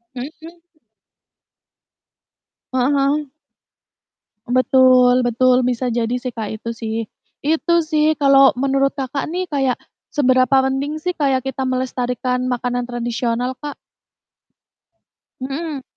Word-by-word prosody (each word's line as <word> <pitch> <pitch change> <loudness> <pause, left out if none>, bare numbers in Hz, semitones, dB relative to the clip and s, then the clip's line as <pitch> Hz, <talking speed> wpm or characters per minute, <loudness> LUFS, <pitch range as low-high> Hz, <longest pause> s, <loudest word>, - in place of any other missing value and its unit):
Mhm 255 +4 -5
mhm? 335 +1 -12 2.1
Heeh 260 +2 +2
heeh. 280 +1 +1 1.2
Betul 255 0 +4
betul 250 +1 +3
bisa 250 0 -1
jadi 235 +1 -1
sih, 250 0 -4
Kak, 220 -2 -5
itu 230 - -5
sih. 225 -1 -5 0.5
Itu 325 +2 +2
sih 310 0 +2
kalau 275 -1 +6
menurut 275 +2 +1
Kakak 275 0 -3
nih 365 +1 -2
kayak 270 -4 0 0.3
seberapa 260 -1 +3
mending 285 +3 -3
sih, 360 - -1
kayak 270 -3 +1
kita 265 0 -3
melestarikan 250 0 -2
makanan 245 0 -2
tradisional, 240 +1 -2
Kak? 295 -1 -6 1.7
Mhm. 275 +2 -4
260 Hz, 110 wpm, -19 LUFS, 250-280 Hz, 2.1 s, kalau